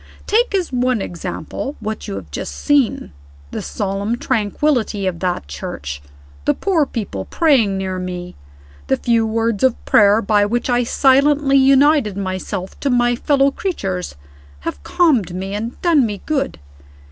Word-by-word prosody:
Take 455 0 +2
as 360 -8 -1
one 250 -1 +1
example 175 - -5
what 220 0 -5
you - - -4
have 90 -7 -8
just 70 0 -5
seen. 280 - +1 0.4
The - - -4
solemn 195 - -2
tranquillity 225 -2 0
of 180 -3 -2
that 180 - -2
church, 70 0 -6 0.4
the - - +2
poor 335 -7 +1
people 185 - -4
praying 250 - +2
near 190 -1 -3
me, 180 -1 -5 0.5
the 135 - +2
few 230 -2 +1
words 225 -1 -1
of 260 -2 +1
prayer 205 0 +5
by 205 0 +3
which 240 +4 -1
I 245 0 +2
silently 275 +2 +3
united 270 -5 +4
myself 185 0 -4
to 280 - -1
my 245 -1 +3
fellow 275 +2 +2
creatures, 195 - -3 0.5
have 70 0 -5
calmed 230 - +2
me 190 +2 -4
and 225 +4 -4
done 330 -6 +4
me 205 -2 -6
good. 280 - -1
225 Hz, 150 wpm, -19 LUFS, 185-275 Hz, 0.5 s, prayer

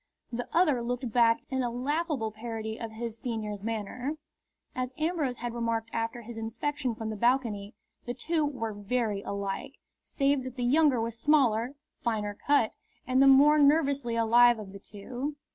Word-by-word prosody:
The 245 +1 -3
other 305 -8 +3
looked 245 0 -3
back 230 0 +4
in 260 0 0
a 245 - 0
laughable 270 -1 -1
parody 220 0 -5
of 225 -2 -6
his 230 0 -5
senior's 215 -5 -4
manner. 230 +6 -3 0.6
As 255 0 -2
Ambrose 310 -6 -1
had 240 0 -4
remarked 230 -1 -2
after 230 +1 -2
his 225 0 -8
inspection 235 +2 -2
from 220 0 -4
the 215 - -3
balcony, 225 -3 0 0.3
the 245 - -3
two 315 +5 0
were 245 -7 -2
very 205 0 -1
alike, 200 +7 -4 0.3
save 275 0 +1
that 255 -1 -7
the 250 - -3
younger 285 -1 +4
was 230 0 -3
smaller, 255 -3 +3 0.3
finer 210 -3 -1
cut, 285 -6 +3 0.3
and 255 +1 +3
the 275 - +7
more 290 +3 +7
nervously 280 -4 +3
alive 235 +1 +5
of 200 -3 -9
the 200 - -9
two. 245 +9 -6
240 Hz, 165 wpm, -29 LUFS, 225-270 Hz, 0.6 s, the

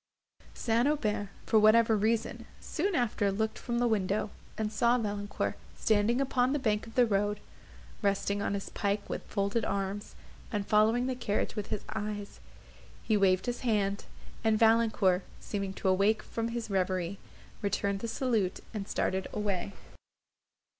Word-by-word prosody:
St. 230 +2 +2
Aubert, 215 -9 0 0.2
for 220 - +4
whatever 220 +1 +6
reason, 220 +2 0
soon 370 +3 -1
after 215 -6 +1
looked 220 +2 -1
from 235 -1 -2
the 240 0 +3
window, 205 -1 0 0.3
and 215 -1 -1
saw 235 +2 +3
Valancourt 205 -3 -2 0.2
standing 220 +3 +2
upon 260 -1 +2
the - - +2
bank 215 -5 0
of 225 - -12
the 250 - +6
road, 205 -1 0 0.6
resting 200 0 +1
on 200 - 0
his 195 - -5
pike 200 0 -1
with - - -3
folded 200 +2 0
arms, 200 0 -3 0.4
and 205 -3 -1
following 220 +4 +3
the 260 - 0
carriage 215 -5 -1
with 210 -2 -3
his 205 - -3
eyes. 205 -1 -4 0.6
He 220 - +2
waved 190 -2 +3
his 245 0 -2
hand, 205 -5 0 0.4
and 220 -1 +3
Valancourt, 220 -5 +4 0.2
seeming 200 -2 -3
to 195 - -2
awake 200 +3 +3
from 230 0 -3
his 230 -2 -4
reverie, 185 -1 0 0.4
returned 200 0 0
the 230 - -4
salute, 225 -5 0
and 205 -2 -4
started 190 0 -1
away. 200 -2 -2
210 Hz, 155 wpm, -30 LUFS, 200-230 Hz, 0.6 s, whatever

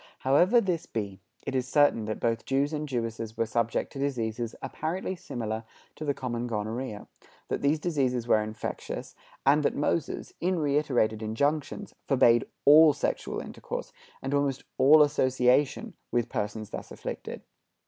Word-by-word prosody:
However 175 - +5
this 180 -6 -1
be, 100 -4 -4 0.3
it - - -3
is 130 -1 0
certain 145 -6 +3
that 110 0 -3
both 115 -1 0
Jews 140 +3 0
and 150 -1 -3
Jewesses 115 -3 -3
were 115 - +1
subject 115 +1 -1
to 135 - -7
diseases 120 -4 -2
apparently 180 +4 -3
similar 115 -9 -4 0.3
to - - -7
the 140 -2 0
common 120 -1 -3
gonorrhoea; 110 0 -4 0.4
that - - -1
these 145 +3 +3
diseases 135 -8 0
were 110 -2 +4
infectious; 110 +1 -5 0.3
and 145 +3 +5
that 145 - +1
Moses, 150 +2 -1
in 185 +1 +1
reiterated 140 -8 +1
injunctions, 145 - -1
forbade 125 -4 +4 0.2
all 155 +1 +8
sexual - - -2
intercourse, - - -6 0.3
and 135 +1 -2
almost 140 -2 0 0.2
all 150 +4 +8
association, 130 -1 +2 0.2
with 120 -1 0
persons 105 +1 -3
thus - - -6
afflicted. - - -6
130 Hz, 150 wpm, -28 LUFS, 115-145 Hz, 0.4 s, all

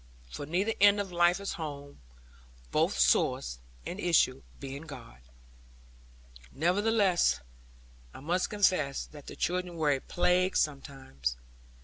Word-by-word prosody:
For 145 - -6
either 190 +8 0
end 205 0 +6
of 195 -2 -3
life 175 +1 +3
is 200 - -4
home; 145 - -7 0.7
both - - +1
source - - +2 0.3
and 180 - -5
issue 165 -8 +2 0.2
being 140 +1 -7
God. 115 - -11 1.3
Nevertheless, 195 +3 +2 0.7
I - - -11
must 175 +6 -1
confess 185 -9 +1
that 145 -2 -14
the - - -8
children 180 0 -2
were 155 -3 +2
a 135 - +1
plague 180 +1 +1
sometimes. 130 - -3
170 Hz, 120 wpm, -30 LUFS, 140-185 Hz, 1.3 s, end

